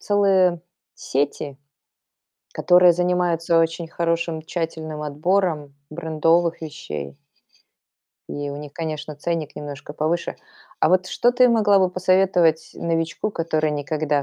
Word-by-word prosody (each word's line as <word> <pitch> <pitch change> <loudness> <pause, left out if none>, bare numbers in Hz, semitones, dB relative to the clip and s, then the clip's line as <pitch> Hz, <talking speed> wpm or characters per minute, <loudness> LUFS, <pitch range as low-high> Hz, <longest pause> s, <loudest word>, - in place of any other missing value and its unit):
целые 190 -4 +3 0.3
сети, 140 0 -2 1.0
которые 180 -1 +5
занимаются 175 -1 +1
очень 165 0 0
хорошим, 170 -1 -1
тщательным 160 -2 -4
отбором 150 -1 -1
брендовых 165 +1 +1
вещей. 75 - -7 1.1
И 145 0 -4
у 140 - -6
них, 145 -1 -9
конечно, 155 -2 -5
ценник 160 -1 -3
немножко 145 0 -7
повыше. 160 +3 -2 0.4
А - - +4
вот 185 +1 +3
что 245 +5 +2
ты 250 0 +5
могла 210 -4 +4
бы 185 -1 +2
посоветовать 185 -3 +2
новичку, 165 +4 -2
который 155 -3 -1
никогда 145 0 -1
165 Hz, 115 wpm, -22 LUFS, 150-180 Hz, 1.1 s, которые